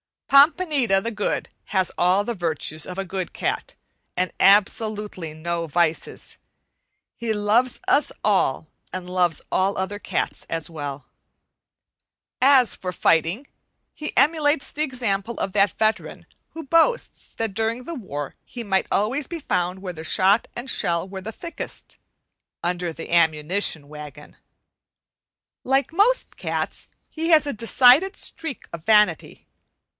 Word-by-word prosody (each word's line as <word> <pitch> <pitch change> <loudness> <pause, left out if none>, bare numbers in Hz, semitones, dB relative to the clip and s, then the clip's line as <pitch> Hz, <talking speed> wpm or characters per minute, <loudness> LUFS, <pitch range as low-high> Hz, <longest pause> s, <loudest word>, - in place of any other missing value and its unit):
Pompanita 280 - +4
the 230 - -2
Good 210 -2 -2 0.2
has 190 -3 0
all 185 +3 +3
the 235 - -3
virtues 160 -4 -2
of 180 - -7
a 195 - -2
good 185 -1 -5
cat, - - -3 0.4
and 185 +1 0
absolutely 205 -3 +2
no 170 +1 -3
vices. 165 +1 -1 0.8
He 230 -2 -1
loves 220 +4 +1
us 290 - +3
all 185 -8 +1 0.3
and 185 -1 -5
loves 180 -3 +1
all 195 +2 +1
other 190 +2 -3
cats - - -3
as 165 0 -2
well. 145 -3 -6 1.4
As 260 -2 +5
for 180 - -5
fighting, 170 - +1 0.5
he 305 - -6
emulates 290 +1 +2
the 300 - -5
example 235 -5 -2
of 195 - -2
that 200 0 +2
veteran 220 0 -1 0.3
who 325 - -8
boasts 330 - +1
that 225 -3 -2
during 225 +3 -1
the 335 - -6
war 145 - -6
he 240 - -7
might 195 -3 0
always 250 +8 0
be 340 - -5
found 180 - -2
where 180 -2 -4
the 160 -1 -8
shot 195 +7 +3
and 240 +2 -6
shell 170 -4 0
were 190 0 -7
the 220 +4 -7
thickest, 335 +7 -7 0.6
under 175 0 -1
the 165 - -9
ammunition 160 -1 +1
wagon. 150 -1 -11 1.3
Like 270 +4 +1
most 435 +8 +2
cats - - -3 0.2
he 325 +1 -3
has 315 -3 +6
a 285 - -2
decided 250 - +5
streak 315 -6 -3
of 165 0 -8
vanity. 210 -1 +2
200 Hz, 140 wpm, -23 LUFS, 175-255 Hz, 1.4 s, has